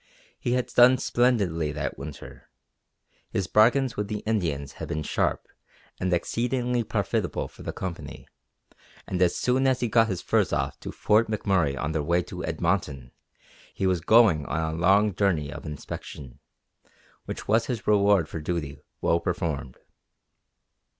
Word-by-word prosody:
He 120 - -1
had 125 0 +1
done 125 +1 +5
splendidly 100 -13 +1
that 70 -2 -3
winter. 70 +2 -10 0.8
His 95 - -1
bargains 115 +6 +3
with 105 0 -2
the 105 -1 -4
Indians 85 -11 -1
had - - -4
been 75 +1 -3
sharp - - -1 0.5
and 90 0 -1
exceedingly 120 +6 0
profitable - - -2
for - - -16
the - - -4
Company 90 -2 -7 0.8
and 90 -1 -3
as 90 -2 +3
soon 130 +2 +1
as 130 -1 +2
he 120 - 0
got 115 +1 +4
his 95 -5 -2
furs - - +1
off - - -2
to - - -7
Fort 110 +2 +2
McMurray 95 -9 +1
on 80 - -2
their 80 -1 -1
way 85 +4 +1
to 90 +1 -7
Edmonton 80 -6 -2 0.6
he 95 - -1
was 90 -3 +1
going 105 -6 +5
on 80 0 -1
a - - -3
long 100 +5 +3
journey 85 -8 0
of - - -8
inspection, 70 -3 -8 0.9
which - - -6
was 115 +2 +2
his 120 -4 -4
reward 100 -5 +4
for 80 - -6
duty 75 -3 -4 0.2
well 85 - +2
performed. 80 -8 -3
90 Hz, 155 wpm, -26 LUFS, 80-110 Hz, 0.9 s, done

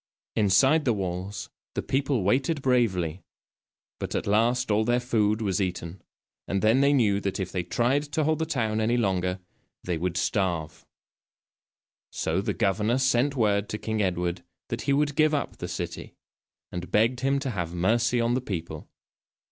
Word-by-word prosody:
Inside 130 +10 +4
the 120 - +2
walls, 95 +1 -4 0.2
the - - -2
people 135 -4 0
waited 135 - +1
bravely, 95 -10 +1 0.8
but - - -4
at - - -1
last 115 +4 +2
all 105 +1 +3
their 120 +2 +2
food 110 -3 +1
was 100 -1 0
eaten, 90 -1 -4 0.5
and 100 +1 -1
then 115 +5 +4
they 140 +1 +4
knew 110 -8 +3
that 100 0 -2
if 95 -1 -3
they 90 - -1
tried 120 +10 +1
to 155 - +1
hold 155 +1 +1
the 160 - -1
town 110 -7 0
any 115 +3 +2
longer 95 -4 0 0.4
they 85 -3 -2
would 90 0 -2
starve. 90 -6 -1 1.2
So - - -1
the - - -2
governor 105 +5 +1
sent 130 +1 +2
word 105 -4 +1
to 105 - -3
King 110 0 -2
Edward 90 -2 -1 0.3
that 115 - -3
he - - +4
would 145 +1 +1
give 155 0 +3
up 145 - -3
the - - -5
city, - - -6 0.6
and 90 0 -5
begged 115 +4 +3
him 135 +1 +1
to 135 -2 -2
have 85 -5 -4
mercy 115 +7 +2
on 115 +1 +1
the 130 - 0
people. 85 -8 -6
110 Hz, 170 wpm, -26 LUFS, 95-130 Hz, 1.2 s, Inside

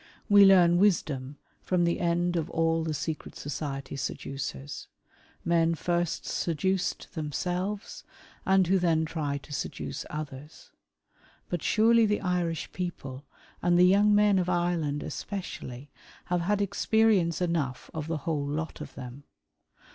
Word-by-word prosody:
We 205 -2 +8
learn 175 -3 +6
wisdom 145 -8 +1 0.2
from 180 -1 +1
the 170 0 +1
end 175 0 +1
of 165 -1 -1
all 165 0 +1
the 160 - -2
secret 155 0 -4
society 140 -2 -5
seducers 130 - -5 0.3
— - - -33 0.3
men 165 -1 +3
first 175 0 -1
seduced 185 +5 -1
themselves, 180 +5 -3 0.4
and 190 -1 +4
who 190 +2 +3
then 165 -2 +2
try 150 -3 -2
to 145 +1 -10
seduce 75 - -4
others. 150 -1 -8 0.8
But 175 -3 -2
surely 225 +4 +4
the 210 0 0
Irish 180 -3 -1
people 145 -7 -6 0.3
and 175 0 +3
the 180 - +7
young 205 +3 +5
men 205 -2 +4
of 180 0 -1
Ireland 175 -5 0
especially, 145 - -6 0.3
have 175 0 0
had 205 +3 +1
experience 200 -3 +2
enough 160 -8 -2
of 155 -1 -4
the 165 -1 -1
wUole 145 -1 -2
lot 155 +2 -4
of - - -9
them. 130 +2 -9
170 Hz, 140 wpm, -28 LUFS, 150-185 Hz, 0.8 s, We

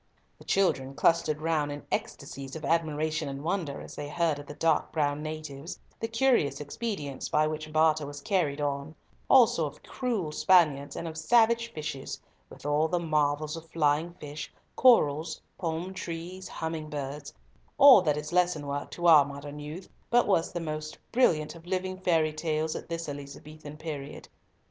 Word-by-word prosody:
The - - -15
children 135 -9 +1
clustered 155 0 +2
round 155 -3 +1
in 145 -1 -7
ecstasies 135 0 -4
of 160 - -6
admiration 155 -2 0
and 135 +1 -6
wonder 165 -5 -2
as - - -10
they 145 0 -5
heard 160 -1 0
of 145 - -10
the 145 - -8
dark 160 -1 +1
brown 145 -1 0
atives, 155 0 -6 0.2
the 225 - -2
curious 230 - +2
expedients 150 - -4
by 155 - +3
which 155 0 -4
barter 155 -1 +3
was 145 0 -7
carried 150 -3 0
on; 145 +1 -3 0.3
also 230 - +5
of 145 - -12
cruel 225 -11 -2
Spaniards, 150 -5 +3
and 170 - -4
of 160 0 -6
savage 235 +5 +3
fishes, 150 -5 -5 0.3
with - - -14
all 145 +2 +2
the 175 - 0
marvels 155 -2 0
of 165 0 -10
flying 160 +2 +1
fish, 150 -2 -7 0.2
corals, 160 - +4 0.2
palm 170 +2 -3
trees, 180 +1 -6
humming 160 -1 -4
birds—all 150 - +3
that 150 -4 +1
is 150 +2 -5
lesson 175 -4 +2
work 140 0 -4
to 175 - -5
our 160 -4 +8
modern 140 +1 -8
youth, 155 +6 -7 0.2
but 240 +1 +4
was 180 -5 +2
the 175 - -3
most 155 -1 -5
brilliant 155 -11 +2
of 170 0 -14
living 185 0 -2
fairy 165 -4 +2
tales 155 0 -1
at - - -7
this 165 -1 -4
Elizabethan 145 +1 -9
period. 150 -3 -7
155 Hz, 165 wpm, -28 LUFS, 145-170 Hz, 0.3 s, our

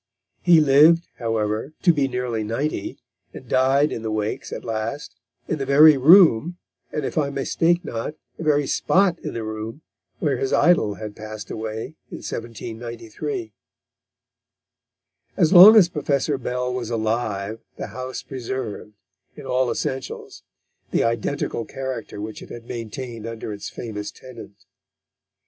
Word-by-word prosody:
He 175 -2 +6
lived, 155 +4 +5
however, 115 +3 -2
to 175 - +6
be 140 -3 +1
nearly 125 -3 -2
ninety, 125 +8 -3 0.4
and - - -10
died 135 +3 +3
in - - -4
the 110 - -3
Wakes 110 0 -3
at - - -6
last, 115 +6 -4 0.3
in 155 - -2
the - - -1
very 150 +2 +8
room, 165 - +6 0.3
and 150 -2 -3
if - - -1
I 140 -2 0
mistake 165 +5 0
not, 115 +6 -4 0.2
the - - -7
very 145 -2 +2
spot 185 +4 +2
in - - -6
the 115 - -3
room, 110 +6 -6 0.3
where - - 0
his 405 -1 -2
idol 135 -13 +3
had 105 +2 -8
passed 110 -1 -8
away 110 +7 -5
in - - -7
1793. 115 - -6 1.8
As 170 -1 +3
long 195 +5 +11
as 200 -6 +7
Professor 145 -4 -1
Bell 125 0 -2
was 125 -3 -4
alive 110 -2 -2 0.2
the - - -5
house 130 0 -6
preserved, 125 -5 -6 0.4
in - - -10
all 125 0 +1
essentials, 130 +2 -4 0.5
the - - +1
identical 115 +1 -1
character 130 -4 -6
which 105 +1 -6
it - - -11
had 120 -1 -9
maintained 115 0 -6
under 115 -1 -6
its 100 - -7
famous 105 -3 -6
tenant. 115 -5 -13
125 Hz, 145 wpm, -23 LUFS, 110-150 Hz, 1.8 s, long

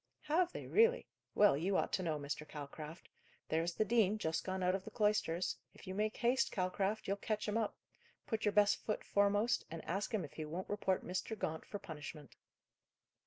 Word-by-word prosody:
"Have 335 +4 +2
they, - - -6
really? 460 +3 +4 0.3
Well, 205 -7 +6
you 185 +7 +1
ought - - 0
to - - +2
know, 160 -4 0
Mr. 145 +1 -4
Calcraft. 150 +2 -8 0.4
There's 165 +2 0
the 215 - +2
dean, 215 -2 +3
just 160 -6 -1
gone 190 0 -2
out 180 0 +3
of 190 0 -2
the 220 - -7
cloisters; 210 -6 +1 0.2
if - - -13
you 185 - -4
make 215 +2 0
haste, 245 +3 +2
Calcraft, 190 +3 -1
you'll 200 +1 0
catch 215 +1 -2
him 210 - -1
up. 225 -2 0 0.5
Put 225 -2 -2
your 210 - +3
best 205 0 +5
foot 215 - -1
foremost, 205 +4 +2
and 165 0 -7
ask 195 +7 -2
him 210 -7 0
if 145 - -13
he 155 - -4
won't 170 +5 -5
report 195 -2 0
Mr. 185 +5 -3
Gaunt 160 -4 -3
for 205 - -4
punishment." 150 -4 -8
195 Hz, 200 wpm, -36 LUFS, 165-215 Hz, 0.5 s, Well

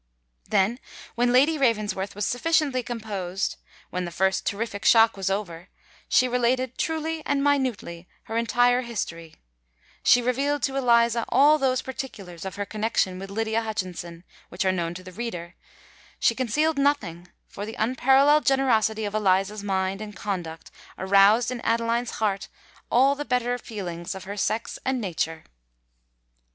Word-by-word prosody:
Then, 215 +6 +2 0.3
when 245 +1 +1
Lady 290 +5 +4
Ravensworth 210 -6 0
was 205 - -2
sufficiently 285 -1 +1
composed—when 200 -5 -5
the 175 - -4
first 190 +2 0
terrific 205 0 -3
shock 225 -1 +6
was 195 -1 -2
over,—she 195 +5 -2
related, 250 +1 0
truly 320 0 -2
and 280 -1 0
minutely, 250 -12 -1 0.2
her 225 - -7
entire 245 +2 +3
history: 170 -9 -5 0.7
she 245 - +5
revealed 275 +4 0
to 270 - 0
Eliza 235 -3 +3
all 295 +4 +5
those 260 -2 +1
particulars 200 -10 -7
of 190 - -5
her 205 - -3
connexion 210 -3 -1
with 195 0 -7
Lydia 220 +2 -1
Hutchinson, 180 -6 -5 0.3
which 190 +3 -3
are 190 - +4
known 170 -2 -2
to 185 - -9
the 185 - -10
reader; 180 -5 -6 0.7
she - - +3
concealed 280 +6 0
nothing—for 200 - -2
the 225 - -7
unparalleled 270 +5 +4
generosity 220 -5 +2
of 205 - -4
Eliza's 200 0 +1
mind 190 0 -1
and 210 -1 -8
conduct 175 -6 -5 0.3
aroused 200 +5 +4
in 245 -2 -5
Adeline's 230 +1 0
heart 205 -2 -1 0.4
all 265 +3 +4
the 290 +1 -4
better 245 -2 0
feelings 185 -5 -6
of 190 - -8
her 200 +1 -6
sex 215 +2 -2
and 260 -1 0
nature. 165 -5 -3
220 Hz, 140 wpm, -25 LUFS, 190-255 Hz, 0.7 s, shock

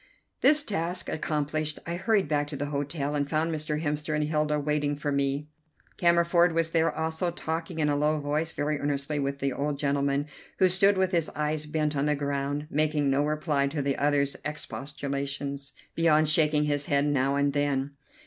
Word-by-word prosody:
This 295 +2 +6
task 180 - -2
accomplished, 155 0 -1
I 170 - -3
hurried 195 0 +1
back 145 -1 0
to 145 - -5
the 145 - -2
hotel, 145 0 -2
and 145 -1 -1
found 160 +2 0
Mr. 155 0 -3
Hemster 150 0 -1
and 150 - +1
Hilda 150 0 0
waiting 145 0 0
for 145 0 -3
me. 140 +1 0 0.5
Cammerford 170 0 +4
was 165 0 +1
there 165 -1 +2
also, 160 +3 -1
talking 165 0 -4
in 155 -2 +1
a 145 - +2
low 150 +1 +1
voice 150 +3 -1
very 150 0 -1
earnestly 145 +1 -1
with 140 0 -1
the 140 -1 -1
old 145 +2 -2
gentleman, 140 0 0 0.3
who 185 - +5
stood 195 +2 +4
with 190 -1 +2
his 170 -4 +1
eyes 150 0 -1
bent 150 -1 -1
on 140 +1 +1
the 150 - +2
ground, 140 +1 -2
making 150 -1 +1
no 140 +2 +2
reply 150 -2 0
to 145 0 -2
the 140 -1 0
other's 140 -1 +1
expostulations 140 -1 -4 0.2
beyond 155 -2 +3
shaking 150 -1 +3
his 145 -1 0
head 140 -3 +2
now 140 -1 +1
and 140 0 +1
then. 145 -1 0
150 Hz, 185 wpm, -27 LUFS, 140-160 Hz, 0.5 s, This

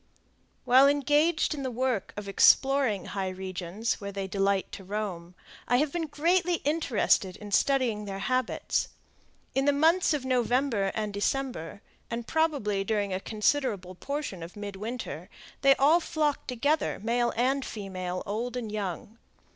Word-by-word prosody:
While 260 +3 +7
engaged 295 +4 +2
in 290 - -5
the 260 - -2
work 250 -3 -1
of 205 -1 -5
exploring 265 +1 +4
high 195 -2 -3
regions 185 +4 -4
where 200 0 -5
they 195 0 -4
delight 195 0 0
to 195 - -8
roam 185 -3 -5 0.3
I 245 - +3
have 295 +2 +1
been 335 -2 -2
greatly 345 +4 +2
interested 255 - +1
in 210 -1 -10
studying 230 -2 +2
their 195 -1 -5
habits. 255 +5 -1 0.7
In 270 +1 +1
the 285 - +5
months 325 +6 +3
of 270 -3 -4
November 245 -4 +1
and 215 -2 -2
December, 205 -4 -2 0.3
and 235 0 -4
probably 280 -12 0
during 205 -2 -1
a 185 - -1
considerable 210 -3 -1
portion 270 - -5
of 165 +2 -9
midwinter, 205 +4 -6 0.3
they 275 0 +6
all 300 +6 +5
flock 310 -4 -1
together, 285 +5 0
male 235 +1 +1
and 265 +4 +1
female, 185 -5 -5
old 235 +5 -3
and 225 -4 -4
young. 210 +2 -5
230 Hz, 145 wpm, -28 LUFS, 200-275 Hz, 0.7 s, While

